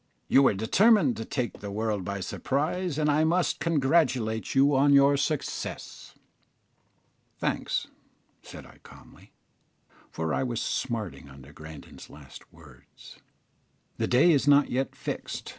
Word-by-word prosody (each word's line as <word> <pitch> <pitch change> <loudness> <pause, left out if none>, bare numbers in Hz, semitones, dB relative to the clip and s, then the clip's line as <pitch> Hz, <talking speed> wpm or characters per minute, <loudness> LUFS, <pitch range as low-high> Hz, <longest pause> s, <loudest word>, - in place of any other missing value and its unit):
"You 135 - +5
were 130 -7 +3
determined 150 - +3
to 115 - -5
take 125 -1 -4
the 100 - -7
world 105 -1 -2
by 100 +1 -5
surprise, 150 - -2
and 155 -1 0
I 150 +1 +2
must 175 +3 0
congratulate 135 -8 0
you 140 +1 +4
on 140 +2 +4
your 140 0 +5
success." 150 +1 -4 1.2
"Thanks," - - -2 0.6
said - - -12
I, - - -18
calmly, - - -17 0.8
for 80 -1 -3
I - - 0
was 120 -3 -2
smarting 110 - -4
under 70 +1 -14
Grandon's 80 -1 -12
last 70 -2 -14
words: 75 -6 -17 0.8
"the - - -1
day 135 +8 +4
is 145 -2 +1
not 145 0 +4
yet 135 +2 -2
fixed. - - -6
130 Hz, 135 wpm, -27 LUFS, 100-145 Hz, 1.2 s, You